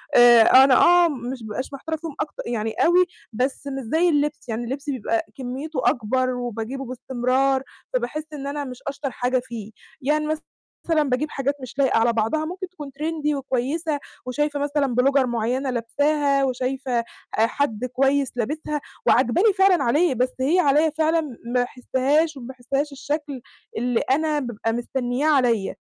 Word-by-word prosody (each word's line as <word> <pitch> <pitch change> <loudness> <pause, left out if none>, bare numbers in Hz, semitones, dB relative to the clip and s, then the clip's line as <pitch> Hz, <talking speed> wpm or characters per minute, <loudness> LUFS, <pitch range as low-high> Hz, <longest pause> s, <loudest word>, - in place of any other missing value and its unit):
آآ، 240 -1 +8 0.2
أنا 270 -1 +5
آه 350 +3 +6
مش 255 -2 -5
ما 220 - -8
بابقاش 255 +6 -5
محتارة 320 +4 -4
فيهم 315 -2 -7
أكت 305 - -3
يعني 225 -2 -2
أوي، 360 +2 +4 0.3
بس 260 +4 -2
مش 270 -1 -4
زي 345 +2 +4
اللبس، 295 -4 -1
يعني 225 +2 -2
اللبس 275 +5 -5
بيبقى 230 -3 -1
كميته 265 +3 -4
أكبر 255 +3 0
وباجيبه 245 +2 -4
باستمرار 260 +2 0 0.3
فباحس 255 +5 -2
إن 280 -2 -5
أنا 285 0 -3
مش 250 -1 -9
أشطر 280 -1 -3
حاجة 250 +1 0
فيه، 225 -4 -8 0.3
يعني 300 +3 +1
مثلًا 310 0 -2 0.7
باجيب 275 +5 0
حاجات 275 +1 -1
مش 255 +1 -9
لايقة 265 -4 +3
على 230 +1 +3
بعضها 230 +8 0
ممكن 365 +2 -6
تكون 300 -6 -9
Trendy 305 -1 -1
وكويّسة 280 +4 -2 0.3
وشايفة 290 +3 -1
مثلًا 285 -3 0
Blogger 275 0 +3
معيّنة 245 +3 -1
لابساها 280 +4 +1
وشايفة 260 +1 -2
آآ 235 - -3 0.4
حد 250 -3 -1
كويّس 270 +2 +1
لابسها، 295 +5 -2 0.3
وعاجباني 270 - +4
فعلًا 385 -2 +4
عليه، 295 +5 +3
بس 250 +2 +1
هي 300 +8 +2
عليَّ 300 0 +3
فعلًا 320 +1 +2
ما 245 -5 -8
باحسهاش 270 +5 0
وما 240 - -8
باحسهاش 270 +3 -3
الشكل 285 -1 -4 0.4
اللي 245 0 +1
أنا 305 +2 +2
بابقى 225 -3 -3
مستنياه 245 +3 -1
عليَّ، 240 -8 +2
270 Hz, 160 wpm, -23 LUFS, 245-300 Hz, 0.7 s, آآ